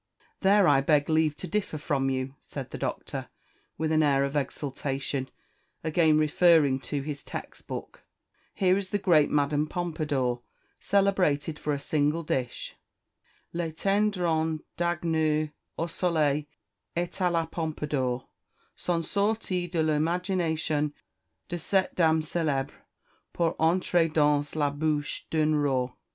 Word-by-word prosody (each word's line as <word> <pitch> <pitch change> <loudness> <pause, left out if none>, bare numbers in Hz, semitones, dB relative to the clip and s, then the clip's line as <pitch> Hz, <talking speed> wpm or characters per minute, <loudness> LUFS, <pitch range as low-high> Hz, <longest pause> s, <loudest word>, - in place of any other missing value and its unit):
"There 195 0 +5
I 140 -3 +5
beg 145 +1 +2
leave 155 -1 +3
to 185 - -6
differ 205 -6 -2
from 140 -2 0
you," 130 0 -2
said - - -8
the - - -6
Doctor, - - -4 0.5
with 160 +1 -1
an 155 0 +4
air 140 -2 +3
of 140 +1 -2
exultation, 140 -1 -2 0.5
again 160 -1 +3
referring 155 -3 +4
to 145 -2 -1
his 145 -1 -5
text - - -8
book - - -7 0.5
"here 185 0 +3
is 190 -2 -5
the 205 - +1
great 170 -7 +4
Madame 145 +1 +1
Pompadour, 150 -8 -1 0.4
celebrated 180 -7 +1
for 150 - -2
a 145 - -1
single 150 +3 0
dish: 130 -5 -3 0.8
'Les 170 -1 -2
tendrons 175 -5 +1 0.2
d'agneau 160 -3 +1 0.3
au 165 - 0
soleil 155 -4 +1 0.5
et 175 +1 -1
à 180 -2 0
la 165 -1 +1
Pompadour, 150 -6 -2 0.5
sont 170 -2 -1
sortis 200 -3 0
de 165 -2 +1
l'imagination 160 -1 0 0.5
de 175 - -4
cette 190 +3 +1
dame 160 -2 +3
célèbre, 155 -4 -1 0.6
pour 165 -2 +1
entrer 170 +1 +3
dans 150 -2 +3
la 145 -2 +1
bouche 150 0 -2
d'un 155 -1 +2
roi." 135 -4 +1
155 Hz, 130 wpm, -28 LUFS, 145-175 Hz, 0.8 s, There